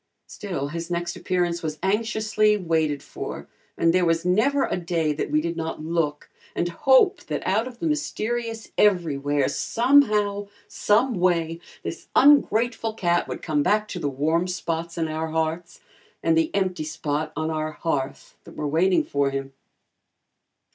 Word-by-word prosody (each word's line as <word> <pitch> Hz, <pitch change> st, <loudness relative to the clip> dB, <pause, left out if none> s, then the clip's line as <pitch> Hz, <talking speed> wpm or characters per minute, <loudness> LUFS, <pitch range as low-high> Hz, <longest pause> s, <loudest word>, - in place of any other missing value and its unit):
Still, 165 Hz, -9 st, -5 dB
his 165 Hz, +2 st, -5 dB
next 175 Hz, 0 st, -2 dB
appearance 175 Hz, -2 st, -1 dB
was 155 Hz, -1 st, -4 dB
anxiously 215 Hz, +1 st, +2 dB
waited 160 Hz, -6 st, 0 dB
for -, -, -7 dB, 0.3 s
and 165 Hz, 0 st, +3 dB
there 185 Hz, 0 st, +3 dB
was 165 Hz, 0 st, +1 dB
never 245 Hz, +10 st, +3 dB
a -, -, -2 dB
day 165 Hz, -3 st, -1 dB
that 145 Hz, -, -3 dB
we 150 Hz, +1 st, +2 dB
did 170 Hz, +1 st, -3 dB
not 160 Hz, -1 st, -4 dB
look 160 Hz, -3 st, -1 dB, 0.3 s
and 175 Hz, -, 0 dB
hope 270 Hz, -, +4 dB
that -, -, -4 dB
out 215 Hz, +6 st, +1 dB
of 250 Hz, -2 st, -10 dB
the 335 Hz, -, -4 dB
mysterious 240 Hz, -7 st, -2 dB
everywhere, 145 Hz, -8 st, +2 dB
somehow, 210 Hz, -6 st, +2 dB, 0.2 s
someway, 180 Hz, -8 st, +1 dB, 0.2 s
this -, -, -6 dB
ungrateful 240 Hz, -5 st, +4 dB
cat 175 Hz, -4 st, +1 dB
would -, -, -6 dB
come 150 Hz, -3 st, +1 dB
back 210 Hz, +7 st, +2 dB
to 180 Hz, -, -5 dB
the 145 Hz, -, -1 dB
warm 160 Hz, +6 st, 0 dB
spots 170 Hz, -2 st, -3 dB
in 165 Hz, -1 st, 0 dB
our 155 Hz, +1 st, -3 dB
hearts, 160 Hz, +2 st, -3 dB, 0.4 s
and 165 Hz, 0 st, +3 dB
the 160 Hz, -1 st, +2 dB
empty 185 Hz, -5 st, 0 dB
spot 155 Hz, -1 st, -3 dB
on 155 Hz, +1 st, -2 dB
our 155 Hz, 0 st, -2 dB
hearth 145 Hz, -4 st, -3 dB
that -, -, -13 dB
were 150 Hz, -, -3 dB
waiting 175 Hz, +6 st, +3 dB
for 140 Hz, -1 st, 0 dB
him. 135 Hz, 0 st, -5 dB
170 Hz, 155 wpm, -24 LUFS, 155-210 Hz, 0.4 s, hope